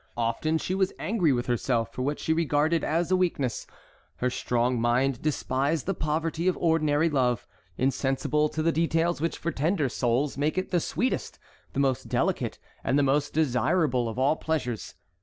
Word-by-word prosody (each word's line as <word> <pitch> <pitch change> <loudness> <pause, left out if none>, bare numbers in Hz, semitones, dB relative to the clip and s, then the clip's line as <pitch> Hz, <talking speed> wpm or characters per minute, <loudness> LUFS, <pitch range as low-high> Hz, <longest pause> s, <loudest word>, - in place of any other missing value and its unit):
Often 120 +7 0
she 180 - -3
was 190 0 +1
angry 190 -7 +1
with 120 -2 0
herself 120 -1 0
for - - -4
what 145 +3 -1
she 160 - +1
regarded 160 0 +1
as 170 +3 0
a - - +5
weakness. 165 -10 -1 0.5
Her 125 0 -1
strong 120 -1 0
mind 120 +2 +1
despised 145 0 0
the 195 - 0
poverty 160 +1 -1
of 185 - +2
ordinary 160 -2 +2
love, 125 -6 +1 0.3
insensible 135 +3 +1
to 155 +1 -2
the 165 - +3
details 165 0 +1
which 165 - -1
for 170 - -2
tender 155 -1 0
souls 130 +4 0
make 150 +4 0
it 185 - -2
the 175 - +3
sweetest, 250 +9 -2 0.4
the - - -2
most 135 -2 0
delicate, - - 0 0.3
and 135 - +1
the 145 - +4
most 140 +2 +1
desirable 130 -2 +1
of 110 - -7
all 140 +4 +2
pleasures. 125 -8 -3
150 Hz, 175 wpm, -27 LUFS, 130-165 Hz, 0.5 s, a